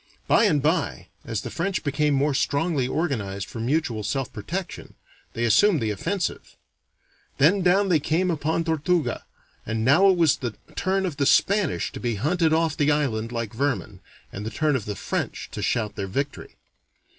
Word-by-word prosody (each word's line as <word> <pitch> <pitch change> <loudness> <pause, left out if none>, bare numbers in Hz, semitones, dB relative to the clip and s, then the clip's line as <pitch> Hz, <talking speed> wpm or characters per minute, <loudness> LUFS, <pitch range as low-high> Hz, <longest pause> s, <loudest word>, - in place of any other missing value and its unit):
By 230 - +5
and 150 -9 +2
by, 150 - 0 0.2
as 115 -2 -3
the - - -7
French 180 +5 -2
became 145 0 +1
more 140 +2 +2
strongly 140 0 0
organized 110 - -2
for 115 - -8
mutual 120 -2 0
self 130 +5 -3
protection, 175 - -6 0.4
they 115 - -2
assumed 155 - +4
the 110 -3 -1
offensive. 175 - -3 0.8
Then 180 +8 +4
down 190 +2 +3
they 165 -4 +4
came 165 +5 0
upon 160 +1 -1
Tortuga, 160 +1 0 0.4
and 110 0 -2
now 170 +10 +6
it 185 - +3
was 165 -5 +4
the 120 -5 -4 0.2
turn 190 +2 0
of 165 -6 -4
the 140 - +1
Spanish 200 -2 +2
to - - -8
be 120 -2 -1
hunted 160 - +1
off 160 -1 +2
the 145 0 +2
island 120 -7 -1
like 115 -2 -4
vermin, 120 -6 -2 0.3
and 100 - -5
the 110 - -3
turn 150 +4 0
of 115 - -2
the 105 - -4
French - - -4
to - - -5
shout 110 -4 -1
their 100 -2 -4
victory. 140 +9 -4
145 Hz, 180 wpm, -24 LUFS, 115-165 Hz, 0.8 s, now